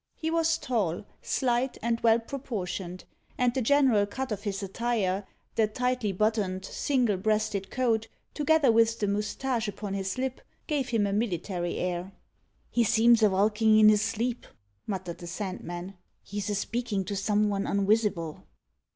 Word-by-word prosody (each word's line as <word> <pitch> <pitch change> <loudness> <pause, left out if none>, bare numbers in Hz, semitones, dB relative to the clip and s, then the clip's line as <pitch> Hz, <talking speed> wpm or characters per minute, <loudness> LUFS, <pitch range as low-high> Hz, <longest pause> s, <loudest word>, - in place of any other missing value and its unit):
He 320 0 -3
was 325 -1 +2
tall, 205 -7 -1 0.2
slight, 245 0 0
and 230 0 +1
well 225 -1 +5
proportioned; 200 -8 -5 0.3
and 250 -1 +2
the 260 - 0
general 250 -5 +4
cut 260 +4 -4
of 205 -2 -3
his 200 -1 -2
attire, 200 -2 -1 0.3
the 220 -1 +2
tightly 250 -1 -1
buttoned, 195 -2 0
single 250 -8 +1
breasted 205 -1 0
coat, 230 -3 0 0.3
together 300 -3 +3
with 230 0 +3
the 210 - 0
moustache 215 +4 -1
upon 205 -1 -5
his 195 +3 -2
lip, 260 0 -2 0.2
gave 290 -5 -1
him 225 -3 +2
a 200 - -1
military 180 -4 -2
air. 180 +1 -3 0.6
"He 240 - +3
seems 230 +1 +5
a 215 - +6
valkin' 210 +3 +3
in 215 0 +8
his 210 -1 +4
sleep," 230 +2 -2 0.4
muttered 185 -4 -4
the 175 - -8
Sandman. 185 -1 -5 0.3
"He's 205 +1 -4
a 205 - 0
speakin' 210 -1 -2
to 200 - -3
some 210 +1 +1
von 200 -1 -1
unwisible." 200 -5 +1
215 Hz, 155 wpm, -28 LUFS, 195-240 Hz, 0.6 s, in